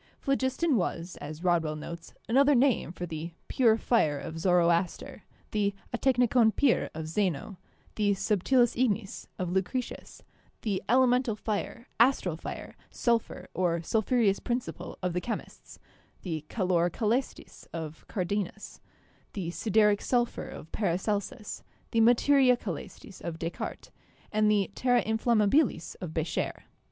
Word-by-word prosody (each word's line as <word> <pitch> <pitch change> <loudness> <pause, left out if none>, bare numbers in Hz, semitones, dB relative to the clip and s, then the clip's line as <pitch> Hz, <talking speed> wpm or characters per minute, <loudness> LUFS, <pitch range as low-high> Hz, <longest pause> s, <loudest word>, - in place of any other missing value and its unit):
Phlogiston 275 +2 +1
was, 175 -1 -2
as 150 +3 -7
Rodwell 165 -4 +2
notes, 165 +2 -8
another 275 +4 +5
name 250 -8 +2
for 175 0 -5
the 165 0 -6
'pure 230 -4 +4
fire' 185 -12 +2
of 160 +3 -6
Zoroaster; 175 0 +1 0.3
the 200 -1 0 0.2
cctekvekov 245 -3 +3
itvp 275 -5 +2
of 160 0 -5
Zeno; 185 +1 -1 0.4
the 210 -1 +1
'subtilis 220 +5 +2
ignis' 220 -5 -1
of 180 -2 -2
Lucretius; 190 +7 -3 0.4
the 200 -4 -1
'elemental 250 -1 +3
fire,' 215 +3 -4
'astral 235 - +3
fire,' 165 - -7
'sulphur,' 230 -6 -1
or 170 -1 0
'sulphureous 220 0 +2
principle' 240 0 -4
of 180 -1 0
the 180 - -1
chemists; 235 - -6 0.5
the 160 -5 -4
'calor 180 -4 +1
cselestis' 230 +8 -2
of 160 -2 -6
Cardanus; 200 0 -3 0.5
the 175 -4 -3
'sideric 210 +1 +3
sulphur' 240 -1 0
of 160 - -10
Paracelsus; 205 +2 -2 0.3
the 225 - +3
'materia 250 +2 +5
cselestis' 190 0 -8
of 170 -2 -5
Descartes, 165 +1 -5 0.4
and 215 0 +3
the 205 -2 +2
'terra 245 -2 +2
inflammabilis' 220 - +2
of 180 -4 -5
Becher. 160 0 -2
205 Hz, 125 wpm, -29 LUFS, 175-240 Hz, 0.5 s, another